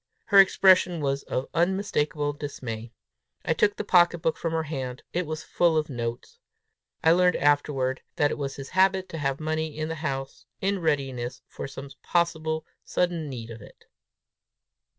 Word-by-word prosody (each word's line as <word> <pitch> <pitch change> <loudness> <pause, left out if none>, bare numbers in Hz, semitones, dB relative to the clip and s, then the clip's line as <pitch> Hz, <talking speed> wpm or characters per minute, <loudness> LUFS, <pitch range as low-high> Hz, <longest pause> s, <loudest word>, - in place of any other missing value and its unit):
Her 200 - +6
expression 185 -2 +5
was 140 -1 -1
of 130 - -3
unmistakable 155 -6 0
dismay. 120 -6 -6 0.5
I - - +2
took 205 +5 +2
the - - -3
pocket 175 -3 +4
book 160 - +2
from 165 - -3
her 160 0 0
hand: 130 -5 -5
it 175 -1 -1
was 155 0 -4
full 170 -2 +2
of 150 -1 -1
notes! 120 -1 -5 0.6
I 160 - +6
learned 180 +1 +4
afterward, 145 -3 +1
that 145 -1 +2
it - - -3
was 135 -1 -3
his 135 -1 -8
habit 190 0 +3
to 165 - -6
have 135 -1 -1
money 155 -1 -2
in 155 0 -2
the - - -2
house, 135 -3 -4
in 195 0 0
readiness 135 -6 -2
for - - -7
some 135 0 -9
possible 160 -2 0 0.2
sudden 175 -4 -1
need 115 -3 -7
of 115 -1 -9
it. - - -16
155 Hz, 170 wpm, -26 LUFS, 135-175 Hz, 0.6 s, Her